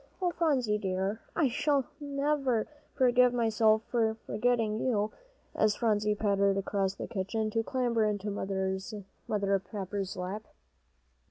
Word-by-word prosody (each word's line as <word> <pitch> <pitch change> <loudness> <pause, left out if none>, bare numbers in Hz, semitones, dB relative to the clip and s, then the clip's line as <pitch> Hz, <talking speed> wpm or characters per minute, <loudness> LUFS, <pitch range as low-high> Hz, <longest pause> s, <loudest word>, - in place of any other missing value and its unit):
"Oh, 360 -2 +1
Phronsie 260 -11 +1
dear, 195 +2 -2
I - - +2 0.6
never 280 -4 0
shall 300 - -22 0.2
forgive 250 -2 +4
myself 220 -2 +3
for 225 -2 +2
forgetting 220 -1 +1
you," 215 -4 0 0.4
as 215 -1 +2
Phronsie 210 -2 +1
pattered 200 -2 +2
across 195 -1 -1
the - - -5
kitchen, 215 +2 -2
to 225 - +1
clamber 240 -2 0
into 205 -1 -1
Mother 195 +1 -2
Pepper's 195 -1 -5
lap. 190 +4 -5
215 Hz, 120 wpm, -30 LUFS, 200-240 Hz, 0.6 s, forgive